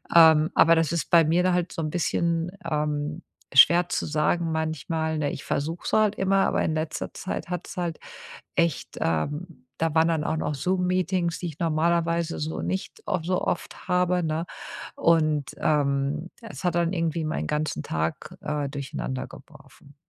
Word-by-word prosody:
Ähm, 160 -1 +7
aber 165 +1 +6
das 165 -2 +1
ist 170 - -2
bei 165 -2 +6
mir 170 +3 +2
da 185 - +3
halt 180 -1 0
so 165 - -3
'n 155 - -2
bisschen, 170 0 0 0.2
ähm, 150 +1 -2 0.3
schwer 170 +6 +7
zu - - -1
sagen 160 +2 +1
manchmal, 160 0 -2
ne? 150 -2 0
Ich 145 - -7
versuche 160 +4 -2
es - - -2
halt 215 -1 +3
immer, 195 0 +2
aber - - +1
in 160 - 0
letzter 155 0 -3
Zeit 185 - -5
hat's 180 +2 -5
halt 175 -3 -3 0.6
echt, 170 -4 0
ähm 145 - -2 0.2
da 165 -1 +1
waren 160 +1 +5
dann 160 -2 +1
auch 160 0 -1
noch 150 -1 -2
Zoom 180 +6 0
Meetings, 180 -2 0
die 180 - -3
ich 155 -3 -8
normalerweise 170 +1 +1
so 155 +1 -3
nicht 190 0 -4
of 185 -5 -1
so 185 +1 0
oft - - -3
habe, 180 0 +2
ne? 160 +1 -1 0.5
Und, 155 -4 +2
ähm, 145 +2 0
es 225 -4 -9
hat 175 -2 +1
dann 170 +1 +1
irgendwie 165 -2 -1
meinen 155 - -2
ganzen 150 - -2
Tag, 80 +1 -3
äh, 150 -2 -2
durcheinander 140 -2 -4
geworfen. 140 - -16
165 Hz, 175 wpm, -26 LUFS, 150-175 Hz, 0.6 s, Ähm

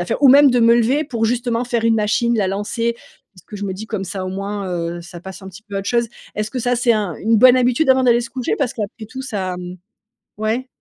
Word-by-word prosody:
a - - 0
à - - -14
faire, - - -2
ou - - +8
même 280 +1 +7
de 250 - +2
me 230 0 +6
lever 255 +6 +2
pour 235 -5 -2
justement 240 0 0
faire 235 -2 -1
une 230 0 +4
machine, 225 +2 +1
la 195 -3 +1
lancer, 230 +4 -2 0.4
parce 185 - -18
que 210 - -11
je 205 - -5
me 195 - -3
dis: 215 +3 -8
«Comme 215 -4 -4
ça 185 +1 -5
au - - -3
moins, 195 +1 -4
heu, 170 -1 -3
ça 175 0 -11
passe 190 +2 -9
un 190 - -8
petit 190 +4 -13
peu 205 -2 -7
à 195 - 0
autre 195 - -5
chose». 235 -1 +1 0.3
Est-ce 210 0 -2
que 260 - -4
ça 245 +1 +1
c'est 240 0 +3
un 205 -6 -1
une 225 +1 +1
bonne 255 +2 +7
habitude 250 +4 +2
avant 260 0 +4
d'aller 240 -1 +4
se 235 0 -7
coucher? 255 0 -2
Parce 275 -4 0
qu'après 215 0 -5
tout 260 +4 -8
ça, 190 -8 -3
mmh 180 0 -7 0.6
ouais? 225 +5 -2
225 Hz, 285 wpm, -19 LUFS, 195-245 Hz, 0.6 s, ou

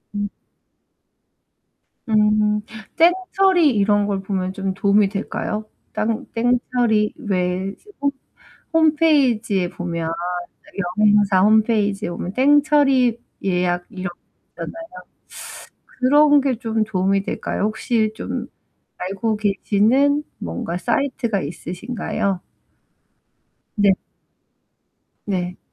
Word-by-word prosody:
음. 205 0 -2 1.8
음 210 -1 +3 0.3
땡처리 370 -1 +3
이런 205 0 +3
걸 195 -2 -1
보면 190 -1 -2
좀 195 -1 -3
도움이 200 +1 +3
될까요? 210 +1 -4 0.3
땅 220 +1 -1
땡처리 240 -2 +1
왜 185 -1 -2 0.3
홈 280 0 +2 0.6
홈페이지에 280 - +3
보면 170 -2 -4 0.9
여행사 205 -3 +4
홈페이지에 215 -1 +2
보면 180 +2 -5
땡처리 275 -3 +4 0.3
예약 180 -1 0
이런 185 -1 -5
거 175 - -15 0.4
있잖아요. 330 0 -8 1.1
그런 290 +2 +5
게 265 -3 0
좀 225 -2 -1
도움이 195 -1 0
될까요? - - -3
혹시 215 0 0
좀 240 +1 -4 0.5
알고 200 +4 -2
계시는 220 +8 +2 0.2
뭔가 85 - -4
사이트가 235 -2 -1
있으신가요? 185 - -3 1.3
네. 200 -2 +4 1.3
네. 180 -3 -3
210 Hz, 195 characters per minute, -21 LUFS, 195-250 Hz, 1.8 s, 그런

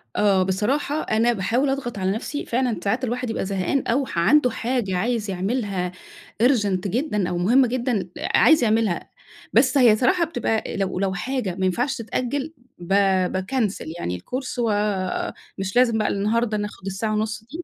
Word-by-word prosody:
آه، 195 -3 +3
بصراحة 260 +11 0
أنا 230 +2 +2
باحاول 235 +7 0
أضغط 270 -5 -3
على 190 0 0
نفسي، 255 +8 -4
فعلًا 240 -4 0
ساعات 225 +6 0
الواحد 250 0 -2
يبقى 225 - -2
زهقان، 195 +7 -1
أو 265 +4 +1
ح 170 - -3
عنده 250 - +4
حاجة 230 -5 -1
عايز 220 +1 -1
يعملها 195 -1 -2 0.5
Urgent 205 -7 +2
جدًا 210 - -1
أو 175 - -2
مهمة 240 +9 +4
جدًا، 235 -6 -1
عايز 315 -5 +4
يعملها. 220 -5 +1 0.4
بس 285 - +4
هي 240 -5 +6
صراحة 335 - +2
بتبقى 225 -11 -2
لو 190 -2 -1
لو 195 -1 0
حاجة 210 -1 -2
ما 190 - +1
ينفعش 245 +9 0
تتأجل 260 +6 -3 0.3
ب 175 - -10 0.4
باكنسل 200 +3 -1
يعني 90 - -3
الcourse 255 - -5
ومش 205 -3 -2
لازم 245 -2 +4
بقى 215 - +1
النهاردة 215 +2 0
ناخد 210 -2 -6
الساعة 200 +3 -2
ونُص 215 +1 -2
دي. 310 +10 -8
220 Hz, 160 wpm, -23 LUFS, 195-250 Hz, 0.5 s, هي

